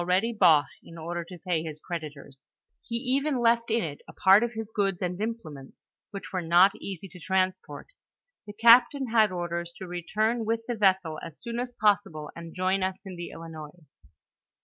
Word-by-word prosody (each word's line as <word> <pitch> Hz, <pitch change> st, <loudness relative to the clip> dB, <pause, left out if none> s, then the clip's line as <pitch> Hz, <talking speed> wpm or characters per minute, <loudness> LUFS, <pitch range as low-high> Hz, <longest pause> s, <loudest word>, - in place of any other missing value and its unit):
98 175 Hz, -, -7 dB
ready 230 Hz, +5 st, 0 dB
bought, 155 Hz, -8 st, +5 dB, 0.2 s
in 170 Hz, -, -13 dB
order 170 Hz, +1 st, -4 dB
to 180 Hz, +2 st, -11 dB
pay 170 Hz, -3 st, +1 dB
bis 155 Hz, -2 st, -7 dB
creditors. 145 Hz, -5 st, -8 dB, 0.5 s
IIo 235 Hz, -, +1 dB
even 275 Hz, +1 st, +1 dB
left 235 Hz, 0 st, +2 dB
in 225 Hz, -1 st, +1 dB
it 145 Hz, -3 st, -6 dB
a -, -, -11 dB
parte.' 210 Hz, +5 st, +5 dB
his 220 Hz, -1 st, -5 dB
goods 195 Hz, -3 st, 0 dB
and 180 Hz, +1 st, -3 dB
implements, 165 Hz, -12 st, -7 dB, 0.2 s
which 200 Hz, -1 st, -8 dB
were 185 Hz, -, -1 dB
not 175 Hz, +4 st, +5 dB
easy 195 Hz, -1 st, -6 dB
to 180 Hz, 0 st, -13 dB
transport. 185 Hz, +1 st, -1 dB, 0.6 s
The 205 Hz, -, -8 dB
captain 235 Hz, +4 st, +5 dB
had 220 Hz, -2 st, +4 dB
ordere 175 Hz, -1 st, -3 dB
to 185 Hz, -, -8 dB
return 215 Hz, +7 st, -1 dB
with 225 Hz, +1 st, -1 dB
the 245 Hz, -, -1 dB
vessel 190 Hz, -7 st, +1 dB
as 160 Hz, -, -9 dB
soon 235 Hz, 0 st, -5 dB
as 245 Hz, 0 st, -4 dB
possible, 200 Hz, -8 st, +1 dB
and 170 Hz, -1 st, -9 dB
join 185 Hz, +1 st, +1 dB
us 185 Hz, 0 st, -1 dB
in 190 Hz, -2 st, -7 dB
the 175 Hz, 0 st, -6 dB
Ilinois. 165 Hz, 0 st, -10 dB
185 Hz, 185 wpm, -27 LUFS, 170-225 Hz, 0.6 s, bought